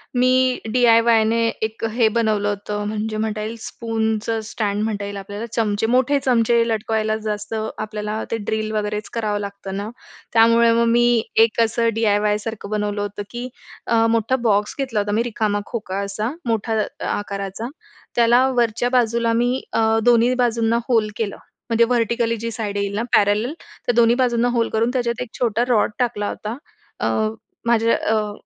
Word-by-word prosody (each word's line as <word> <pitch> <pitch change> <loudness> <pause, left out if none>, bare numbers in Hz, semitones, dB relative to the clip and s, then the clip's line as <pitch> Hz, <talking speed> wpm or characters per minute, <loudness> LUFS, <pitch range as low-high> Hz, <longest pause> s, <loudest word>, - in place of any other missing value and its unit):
मी 255 0 +3
डी-आय-वायने 230 -2 +4 0.2
एक 220 +1 -3
हे 235 -2 +3
बनवलं 215 -2 +1
होतं. 205 +1 -3
म्हणजे 215 0 -3
म्हणता 215 -1 -2
येईल 220 +2 -4
स्पूनचं 225 0 -2
स्टँड 210 -1 -2
म्हणता 210 -2 -2
येईल 200 0 -6
आपल्याला. 205 +3 -6
चमचे 210 -2 0
मोठे 255 +4 +3
चमचे 235 -2 +3
लटकवायलाच 220 0 -1
जास्त 210 0 -4 0.2
आपल्याला 215 0 -4
ते 230 - 0
ड्रिल 215 0 -2
वगैरेच 210 0 -2
करावं 215 -3 -1
लागतं 200 -1 -6
ना. 205 +2 -4 0.4
त्यामुळे 230 0 +5
मग 235 0 +3
मी 240 -1 +4 0.2
एक 225 0 -6
असं 230 +1 +2
डी-आय-वाय 210 -1 +2
सारखं 215 -1 -6
बनवलं 210 -1 -1
होतं 205 0 -4
की 240 +1 -5 0.4
अ, 225 -1 +3
मोठा 230 +2 +1
बॉक्स 205 -1 +1
घेतला 255 -6 -1
होता, 205 0 -1
मी 220 +3 +1
रिकामा 215 -3 -1
खोका 205 -4 -4
असा 210 +5 -3
मोठा 225 -1 0
अ, - - -6
आकाराचा, 200 +2 -3 0.5
त्याला 240 +2 +5
वरच्या 235 +1 +1
बाजूला 235 -2 +2
मी 245 +3 +1
अ, - - +1 0.3
दोन्ही 240 +1 +5
बाजूंना 230 0 +1
होल 225 -4 +2
केलं. 210 -3 -3 0.3
म्हणजे 230 0 +4
व्हर्टिकली 235 -1 +1
जी 230 - -2
साईड 210 -3 -4
येईल 200 0 -1
ना 215 - 0
पॅरलल, 210 +7 +2 0.3
तर - - +4
दोन्ही 235 0 +5
बाजूंना 245 -2 +2
होल 235 -1 +1
करून 225 +2 +2
त्याच्यात 240 -2 -1
एक 250 - -5
छोटा 235 -1 +1
रॉड 220 -3 +3
टाकला 220 -5 0
होता. 215 +3 -5 0.4
अ, - - 0 0.6
माझ्या 230 -1 +3
अ, 215 -1 0
225 Hz, 165 wpm, -21 LUFS, 210-235 Hz, 0.6 s, त्यामुळे